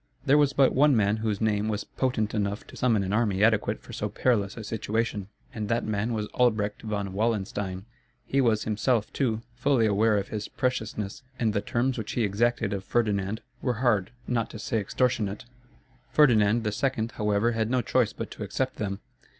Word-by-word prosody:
There 145 +1 +5
was 145 -2 +4
but 135 -2 +4
one 145 0 +5
man 105 -1 +2
whose 110 -2 -1
name 105 -1 +1
was 105 -1 -1
potent 125 -5 -1
enough 100 -1 -2
to - - -13
summon 115 -5 +2
an 95 +1 -2
army 105 -3 +2
adequate 110 -1 +2
for - - -11
so - - -2
perilous 105 -5 0
a 115 - -6
situation; 110 -1 -2 0.3
and 105 -2 -4
that 115 0 +1
man 110 +2 -1
was 110 -2 -1
Albrecht 110 -4 +1
von 100 -3 -3
Wallenstein. 100 -3 -2 0.4
He 135 - +1
was 115 -4 +2
himself, 110 +1 0
too, 115 -5 0
fully 125 -1 +2
aware 105 +1 +3
of 100 -1 -2
his 105 -1 -4
preciousness 110 -2 -2 0.2
and 115 -3 +1
the 100 - 0
terms 120 +4 0
which 110 0 -4
he 120 - +1
exacted 110 +1 +1
of 95 -1 -3
Ferdinand 105 -1 0 0.2
were 125 - 0
hard, 110 -5 +1 0.2
not 115 -2 0
to - - -8
say 110 +2 -1
extortionate. 110 -1 -1 0.6
Ferdinand 115 -6 +4
II., 115 +2 0
however, 105 +2 +1
had 115 -1 -1
no 125 0 +1
choice 125 -4 +2
but - - -6
to - - -10
accept 130 +6 -2
them. 100 -2 -3
110 Hz, 185 wpm, -27 LUFS, 105-120 Hz, 0.6 s, There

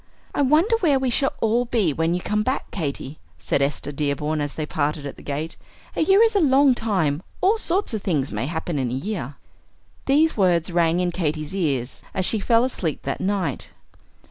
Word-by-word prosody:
"I - - 0
wonder 310 - +4
where 300 -9 +3
we 265 -2 0
shall 270 +3 +2
all 230 +2 +2
be 220 -10 +1
when 165 +3 0
you 180 - -2
come 210 +3 0
back, 260 +5 -2
Katy," 145 -4 -4 0.2
said - - -1
Esther 140 +1 -1
Dearborn 150 +1 -1
as 145 -1 -4
they 155 - -3
parted 150 -1 -2
at 140 - -6
the - - -14
gate. 150 +3 -4 0.4
"A - - 0
year 385 +7 +5
is 455 -2 +2
a - - +5
long 275 -2 +5
time; 185 -11 0 0.2
all 410 +5 +3
sorts 370 - +2
of 215 - -2
things 150 -9 -1
may 105 +5 -2
happen 160 -1 -3
in 130 -2 -1
a 125 - -3
year." 170 -2 -4 0.7
These 305 +4 +3
words 180 -3 +2
rang 170 0 +2
in 180 -1 0
Katy's 155 -1 -3
ears 140 -9 -2
as 185 - 0
she 220 - +2
fell 230 +3 +3
asleep 180 - -2
that 135 - -3
night. 190 -2 -2
180 Hz, 200 wpm, -23 LUFS, 150-245 Hz, 0.7 s, year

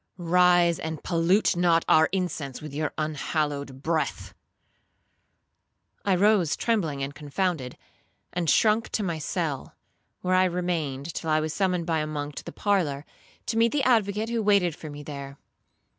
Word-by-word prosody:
rise, 175 -1 +4
and 160 -1 -5
pollute 175 +4 +2
not 170 -1 +3
our 160 0 +5
incense 170 -8 -3
with 150 -2 -9
your 155 +1 -2
unhallowed 145 -3 -2
breath!' 160 -1 -2 1.7
I 195 -2 +2
rose 195 -4 +3
trembling 165 -12 0
and 140 +1 -4
confounded, 150 -2 -3 0.6
and 175 -3 -1
shrunk 220 +7 +3
to 215 - 0
my 170 -4 -2
cell, 155 -3 -3 0.5
where 185 0 0
I 185 0 +5
remained 170 -5 -2
till 160 - -4
I 155 0 +3
was 155 0 -2
summoned 180 -3 0
by 165 -2 0
a 155 - -2
monk 145 -1 -4
to - - -5
the - - -8
parlour, 160 -9 0 0.4
to 225 - -2
meet 230 0 +4
the 290 -2 +1
advocate, 220 -3 +2
who 235 -1 0
waited 200 -6 +3
for 155 - -9
me 145 0 -8
there. 140 -1 -8
165 Hz, 160 wpm, -26 LUFS, 150-185 Hz, 1.7 s, our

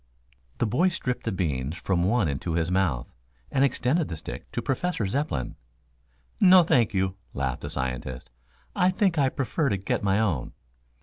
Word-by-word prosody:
The - - +1
boy 135 - +2
stripped 125 -8 -3
the 115 - 0
beans 75 -5 -2
from 90 -1 0
one 100 +1 +2
into 70 +4 -2
his 85 +1 0
mouth 90 -10 0 0.4
and 135 - +3
extended 140 +4 +1
the 85 - -5
stick 75 - -8
to - - -2
Professor 160 - -1
Zepplin. 95 - -2 0.8
"No, 185 -3 +8
thank 120 -8 +3
you," 95 0 0 0.2
laughed 65 -2 -2
the - - -5
scientist. 65 -1 -4 0.4
"I 180 - +4
think 185 -4 +1
I 135 -2 +4
prefer 140 +3 -1
to 100 - 0
get 95 - -2
my 100 0 +2
own." 90 - -1
100 Hz, 170 wpm, -26 LUFS, -, 0.8 s, No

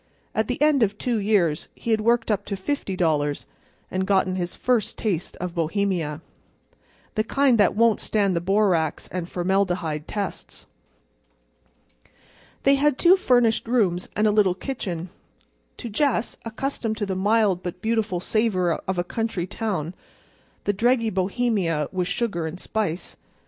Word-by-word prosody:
At 220 -1 0
the 250 - -2
end 300 -3 +4
of 205 -2 +2
two 235 -1 -1
years 195 -7 +1
he 230 - -4
had 220 -1 +2
worked 230 0 +2
up 205 - 0
to 200 - -3
$50, 175 - -1 0.5
and 190 0 -1
gotten 190 -2 +2
his 175 -1 -3
first 245 -4 0
taste 185 -6 -2
of 180 -1 -5
Bohemia—the 170 +4 -4
kind 265 -1 +3
that 205 - +4
won't 230 0 +4
stand 200 -4 +1
the 170 - 0
borax 185 -4 +1
and 180 0 -4
formaldehyde 175 -4 0
tests. 205 -2 -5 2.0
They 275 - +5
had 290 -1 +2
two 355 +2 +6
furnished 245 -11 +2
rooms 195 -7 +1
and 210 - +2
a 215 - +4
little 205 -4 +3
kitchen. 185 -8 -4 0.7
To - - -6
Jess, 240 +1 0
accustomed 230 -1 -3
to 210 - -1
the 195 - -2
mild 200 -1 +2
but 180 0 -5
beautiful 220 -3 0
savor 185 -4 +1
of 190 -1 -1
a 175 - +1
country 220 -2 -2
town, 185 -5 -3 0.7
the 205 - +1
dreggy 230 +1 +2
Bohemia 190 - 0
was 180 -2 -1
sugar 180 -5 -1
and 165 +3 -7
spice. 195 -6 -3
200 Hz, 145 wpm, -24 LUFS, 180-225 Hz, 2.0 s, two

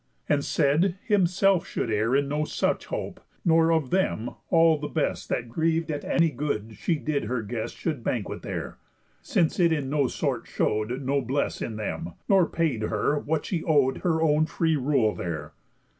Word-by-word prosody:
And 145 -1 +2
said, 165 +7 +2
himself 195 -2 +3
should 115 - -2
err 110 +4 +1
In 140 0 +2
no 150 +2 -1
such - - -1
hope; - - -4 0.3
nor 165 -1 +4
of 160 -5 +1
them 180 -11 0 0.2
all 165 -3 +5
the 150 - -3
best 155 - -2
That 120 - -1
griev'd 160 +5 0
at 145 -1 -4
any 165 -2 +2
good 115 -6 -3
she 170 - +1
did 145 -2 -2
her 115 0 -2
guest 115 +1 -5
Should 150 -8 -3
banquet 115 -3 -2
there; - - -5 0.4
since 165 +1 +1
it 170 -2 +4
in 145 -4 -1
no 145 -3 +2
sort - - -2
show'd 110 +5 -1
Noblesse 140 +1 -1
in 110 - -3
them, 100 -5 -4
nor 190 -3 +5
paid 155 -9 -1
her 110 +7 0
what 155 +1 -2
she 170 -4 -2
ow'd 140 -5 +2
Her 160 -2 +1
own 155 0 +3
free 160 -1 +1
rule 130 -6 +2
there. 80 -3 -5
145 Hz, 175 wpm, -26 LUFS, 120-165 Hz, 0.4 s, all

